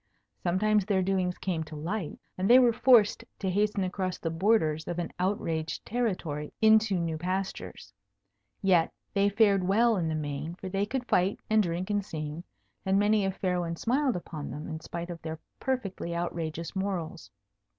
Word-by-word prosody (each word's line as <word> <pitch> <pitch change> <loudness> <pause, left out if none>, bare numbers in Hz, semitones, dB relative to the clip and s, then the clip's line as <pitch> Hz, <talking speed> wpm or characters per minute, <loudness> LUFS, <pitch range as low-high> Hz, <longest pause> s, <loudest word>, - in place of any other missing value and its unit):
Sometimes 210 +4 +2
their 190 -1 +1
doings 185 -1 0
came 170 -4 -2
to 155 - -9
light, 170 +3 -3 0.2
and 185 +1 -1
they 245 - +9
were 245 -2 +5
forced 225 -3 +5
to 190 -2 -2
hasten 205 +1 +1
across 185 0 -2
the 165 - -3
borders 165 -4 +2
of 175 - -3
an 175 -1 -3
outraged 165 -4 -1
territory 180 -11 -2
into 220 -2 +5
new 165 -2 -2
pastures. 185 +3 -4 0.7
Yet 180 -4 +4 0.2
they 200 0 +3
fared 200 -2 +4
well 220 +4 +3
in 170 -3 0
the 160 - -1
main, 150 +2 -4
for 190 +1 -7
they 195 +2 0
could 250 +2 -2
fight 185 +3 +2
and 220 0 +5
drink 180 +1 -2
and 205 -1 +1
sing; 155 -2 -5 0.4
and 190 0 +2
many 205 0 +3
a 195 - +1
fair 180 -1 -1
one 170 -1 -2
smiled 255 - +1
upon 160 -4 -6
them, 150 - -6
in 160 -1 -5
spite 170 +2 -6
of 170 - -8
their 160 -1 -5 0.2
perfectly 200 -10 -2
outrageous 170 0 -3
morals. 190 -4 -3
185 Hz, 175 wpm, -29 LUFS, 165-205 Hz, 0.7 s, they